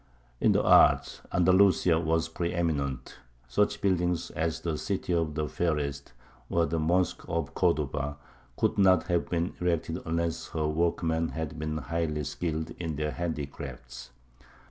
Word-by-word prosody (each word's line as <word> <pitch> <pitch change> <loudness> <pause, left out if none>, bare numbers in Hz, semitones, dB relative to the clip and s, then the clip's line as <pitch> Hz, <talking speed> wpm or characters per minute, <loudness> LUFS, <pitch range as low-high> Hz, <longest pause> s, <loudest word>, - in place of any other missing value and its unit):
In - - +4
the - - +2
arts - - +5
Andalusia 90 -1 +4
was 80 0 +1
pre 85 +1 -3
eminent; 70 -7 -2 0.3
such 105 +12 +1
buildings 90 -3 0
as 80 0 -2
the 85 -2 -2
"City 95 +2 -2
of 80 -3 0
the 75 -1 -1
Fairest," 70 -5 -2 0.4
or 85 0 +2
the 80 +2 -1
mosque 90 +3 +1
of 85 -3 -2
Cordova, 75 0 0 0.4
could 110 - +1
not 95 -2 +5
have 85 -1 +1
been 85 0 -1
erected 85 -1 0
unless 85 0 -2
her 80 -1 0
workmen 80 0 0
had 80 -2 -5
been 75 0 -2
highly 80 -1 -2
skilled 80 +2 -3
in 80 -3 -3
their 75 +1 -2
handicrafts. 70 -6 -6
80 Hz, 145 wpm, -28 LUFS, 75-85 Hz, 0.4 s, arts